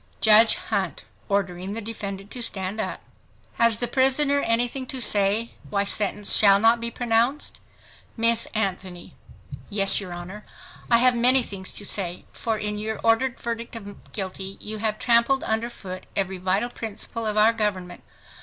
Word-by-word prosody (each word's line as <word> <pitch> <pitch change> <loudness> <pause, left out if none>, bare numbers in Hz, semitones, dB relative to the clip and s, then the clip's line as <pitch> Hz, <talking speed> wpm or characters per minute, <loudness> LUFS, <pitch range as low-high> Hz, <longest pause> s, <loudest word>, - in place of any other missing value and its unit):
JUDGE 220 +1 +7
HUNT - - -3 0.2
(Ordering 190 -1 -2
the 225 - -3
defendant 205 -3 -6
to 250 - -7
stand 200 -2 -2
up) - - -5 0.6
Has 230 -2 +4
the 245 - -1
prisoner 275 +2 +2
anything 245 +1 -1
to 260 - -4
say 210 0 +2 0.2
why 200 -1 0
sentence 205 0 +1
shall 200 -2 +6
not 225 +2 +4
be 235 0 -2
pronounced? 240 +4 -1 0.6
Miss 230 0 +3
ANTHONY—Yes, 195 +1 -2
your 185 -3 -8
Honor, 180 +4 -8 0.5
I 235 - +6
have 250 +1 +4
many 250 +2 +4
things 190 -4 -5
to 205 - -2
say; 180 -3 -1
for 225 -2 -2
in 210 0 -3
your 220 +1 -4
ordered 235 +3 +1
verdict 235 0 -5
of 205 -3 -11
guilty, 190 -1 -5
you 215 0 -6
have 215 0 -1
trampled 235 +4 +3
under 225 +2 -1
foot 185 -5 -9
every 190 -1 -2
vital 190 +6 0
principle 225 0 -4
of 215 0 -2
our 215 +2 +5
government. 200 -5 -3
215 Hz, 155 wpm, -24 LUFS, 195-235 Hz, 0.6 s, JUDGE